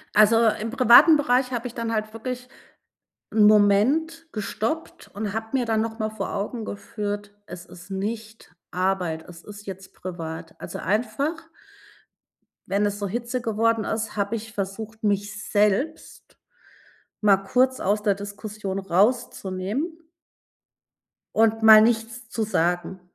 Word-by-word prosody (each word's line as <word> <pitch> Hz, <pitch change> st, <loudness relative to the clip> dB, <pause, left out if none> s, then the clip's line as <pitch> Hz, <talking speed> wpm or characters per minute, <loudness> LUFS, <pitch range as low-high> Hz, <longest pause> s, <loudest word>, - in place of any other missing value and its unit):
Also, 225 Hz, +2 st, +6 dB
im 220 Hz, +1 st, -1 dB
privaten 265 Hz, +5 st, +7 dB
Bereich 255 Hz, -2 st, +1 dB
habe 240 Hz, 0 st, -2 dB
ich 235 Hz, -, -11 dB
dann 230 Hz, -1 st, -2 dB
halt 215 Hz, 0 st, -2 dB
wirklich 250 Hz, +2 st, -5 dB, 0.8 s
‘n 215 Hz, -1 st, +5 dB
Moment 250 Hz, +12 st, +3 dB
gestoppt 225 Hz, +8 st, -4 dB
und 205 Hz, 0 st, -4 dB
habe 225 Hz, 0 st, -3 dB
mir 255 Hz, -3 st, +1 dB
dann 220 Hz, -1 st, +1 dB
noch 225 Hz, 0 st, -5 dB
mal 215 Hz, 0 st, -1 dB
vor 220 Hz, -, -5 dB
Augen 215 Hz, +3 st, -3 dB
geführt, 205 Hz, 0 st, -5 dB
es 180 Hz, -2 st, -10 dB
ist 180 Hz, +3 st, -14 dB
nicht 215 Hz, +3 st, -5 dB, 0.2 s
Arbeit, 180 Hz, -3 st, -1 dB
es 170 Hz, -1 st, -12 dB
ist 205 Hz, 0 st, -11 dB
jetzt 190 Hz, 0 st, -8 dB
privat. 165 Hz, -3 st, -7 dB
Also, -, -, -7 dB
einfach 275 Hz, -, -1 dB, 1.2 s
wenn 200 Hz, +1 st, +1 dB
es 205 Hz, -, -3 dB
so 200 Hz, -, -2 dB
Hitze 240 Hz, +4 st, -3 dB
geworden 225 Hz, 0 st, +1 dB
ist, 220 Hz, -1 st, -3 dB
habe 200 Hz, +2 st, -1 dB
ich 225 Hz, 0 st, -7 dB
versucht, 215 Hz, +3 st, -5 dB
mich 205 Hz, 0 st, -1 dB
selbst 210 Hz, +10 st, -1 dB, 0.8 s
mal 200 Hz, -2 st, +5 dB
kurz 255 Hz, +6 st, +1 dB
aus 205 Hz, +2 st, 0 dB
der 205 Hz, -2 st, +2 dB
Diskussion 205 Hz, -1 st, -6 dB
rauszunehmen 205 Hz, -, 0 dB, 1.4 s
und 225 Hz, 0 st, +3 dB
mal 220 Hz, -1 st, +10 dB
nichts 225 Hz, 0 st, 0 dB
zu 225 Hz, -, -2 dB
sagen. 175 Hz, -2 st, -1 dB
215 Hz, 135 wpm, -24 LUFS, 200-230 Hz, 1.4 s, mal